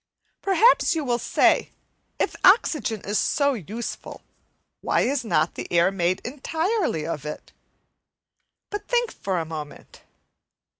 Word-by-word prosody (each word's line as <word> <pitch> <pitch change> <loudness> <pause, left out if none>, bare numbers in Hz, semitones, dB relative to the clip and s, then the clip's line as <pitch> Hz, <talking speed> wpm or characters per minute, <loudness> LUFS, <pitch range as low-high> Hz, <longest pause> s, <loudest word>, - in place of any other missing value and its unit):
Perhaps 390 -1 +4
you 315 - -1
will 240 -1 0
say, - - +2 0.5
If - - -1
oxygen 300 - +3
is 205 0 -1
so 285 -1 +1
useful, 225 - -7 0.6
why - - +1
is 270 -1 0
not 160 -7 +1
the - - -7
air 175 +2 +4
made 185 -1 0
entirely 320 - -1
of 150 -4 -4
it? 150 0 -7 1.2
But 415 0 -5
think 485 -1 +1
for 190 -2 -3
a 165 - -1
moment. 155 -2 -9
235 Hz, 130 wpm, -24 LUFS, -, 1.2 s, Perhaps